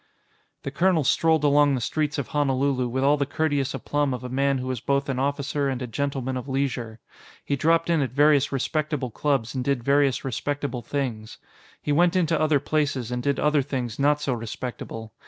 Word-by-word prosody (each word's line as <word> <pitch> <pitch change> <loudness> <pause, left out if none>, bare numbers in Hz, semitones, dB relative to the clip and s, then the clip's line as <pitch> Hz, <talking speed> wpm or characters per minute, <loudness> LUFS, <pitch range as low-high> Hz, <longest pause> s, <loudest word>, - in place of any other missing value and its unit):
The 135 - -4
colonel 175 +1 +2
strolled 160 +3 +2
along 145 -1 +4
the - - -1
streets 150 +4 -1
of 140 - -3
Honolulu 135 -3 +1
with 130 +2 -2
all 145 +2 +4
the 140 -1 -1
courteous 145 -3 -1
aplomb 145 -3 -1
of 125 - -9
a 125 - -5
man 135 +1 +1
who 130 - -4
was 130 -2 -3
both 140 +3 0
an 130 -2 -1
officer 140 +1 -1
and 130 -2 -2
a 130 - -3
gentleman 130 +1 -2
of 125 +2 -6
leisure. 125 -4 -2 0.5
He 140 - 0
dropped 165 +4 +2
in 165 -3 +2
at 135 - 0
various 145 0 +4
respectable 145 -1 -2
clubs 135 -3 -1
and 130 -2 -2
did 135 -2 0
various 140 0 +2
respectable 140 0 -3
things. 115 -4 -4 0.5
He 145 - -1
went 175 +4 +3
into 165 -3 +2
other 155 -2 +3
places 140 -4 -1
and 125 0 -2
did 140 +2 0
other 150 -1 +3
things 130 -4 -4
not 145 +1 +3
so 140 -3 -1
respectable. 115 -1 -6
140 Hz, 195 wpm, -25 LUFS, 130-145 Hz, 0.5 s, along